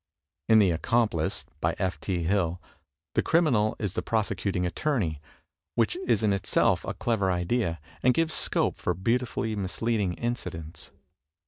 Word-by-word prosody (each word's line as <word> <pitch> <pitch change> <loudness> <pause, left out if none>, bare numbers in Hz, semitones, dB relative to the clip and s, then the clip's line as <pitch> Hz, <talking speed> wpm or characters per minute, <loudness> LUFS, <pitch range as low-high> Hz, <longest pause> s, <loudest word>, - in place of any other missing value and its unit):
In 110 - +7
"The 100 -4 +5
Accomplice," 85 -1 0
by - - 0
F. 95 -1 -1
T. 90 -3 -2
Hill, 90 -1 +1 0.5
the - - +3
criminal 130 -11 +2
is 100 -4 -2
the - - -1
prosecuting 100 -4 -1
attorney, 90 - -1 0.5
which 115 +5 +2
is 115 -4 +2
in 105 -2 +3
itself 100 - +2
a - - -4
clever 100 -5 0
idea, 90 -1 0 0.2
and 125 - +5
gives 165 -1 +2
scope - - +1
for 90 - -1
beautifully 115 +3 -1
misleading 100 0 -1
incidents. 85 -9 -5
100 Hz, 140 wpm, -27 LUFS, 90-115 Hz, 0.5 s, In